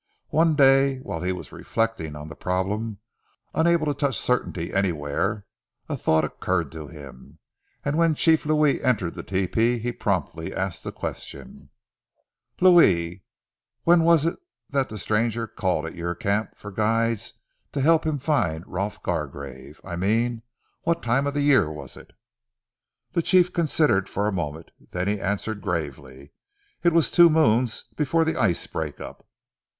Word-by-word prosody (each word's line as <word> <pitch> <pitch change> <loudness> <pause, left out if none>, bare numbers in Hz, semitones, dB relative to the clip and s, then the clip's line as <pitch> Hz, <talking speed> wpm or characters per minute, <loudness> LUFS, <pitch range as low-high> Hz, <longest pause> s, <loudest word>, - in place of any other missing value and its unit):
One 160 0 +3
day, 135 -1 +5
whilst 85 +2 -4
he - - +1
was 90 - -7
reflecting 115 -10 -2
on 75 +1 -8
the 80 - -9
problem, 100 +4 -2 0.6
unable 170 -1 +3
to 145 - +1
touch 140 -5 -1
certainty 95 -9 -1
anywhere, 95 +2 -1 0.4
a - - -2
thought 80 -1 +2
occurred 85 -1 -2
to 80 -2 -8
him, 70 -6 -12 0.5
and 145 +3 0
when 165 -2 +3
Chief 160 +1 +3
Louis 150 -1 +2
entered 100 -9 +1
the - - -6
tepee 110 +6 +1
he 120 +2 -2
promptly 90 -7 -2
asked 95 -1 -3
a - - -3
question - - -8 0.9
"Louis, 95 - +5 0.6
when 170 0 +5
was 165 -2 +4
it 165 - -1 0.3
that 135 -2 +1
the 110 - -6
stranger 115 +3 0
called 90 -6 -1
at 80 - -6
your 85 0 -3
camp 100 +5 -1
for 105 - -9
guides 115 +2 0 0.4
to 145 - -3
help 160 +3 +4
him 155 -2 -1
to 140 - -14
find 85 - 0
Rolf 100 +3 -4
Gargrave? 70 -4 -5
I 85 -2 -6
mean 115 +5 0 0.4
what 170 0 0
time 125 +4 +1
of 140 - -3
the 145 - +1
year 140 - +4
was 70 -4 -9
it?" - - -14 1.0
The 170 - +1
chief 180 +1 +4
considered 150 - +2
for 100 - -1
a - - +1
moment. 80 -3 -4 0.2
Then 90 +1 -2
he 100 -1 -1
answered 100 +2 -2
gravely. 70 -4 -5 0.5
"It 175 - +4
was 165 -1 +3
two 175 -1 +7
moons 125 -7 +2
before 160 +2 +1
ze 160 - +1
ice 90 -6 +1
break 80 -2 -5
up." - - -10
105 Hz, 160 wpm, -24 LUFS, 85-145 Hz, 1.0 s, two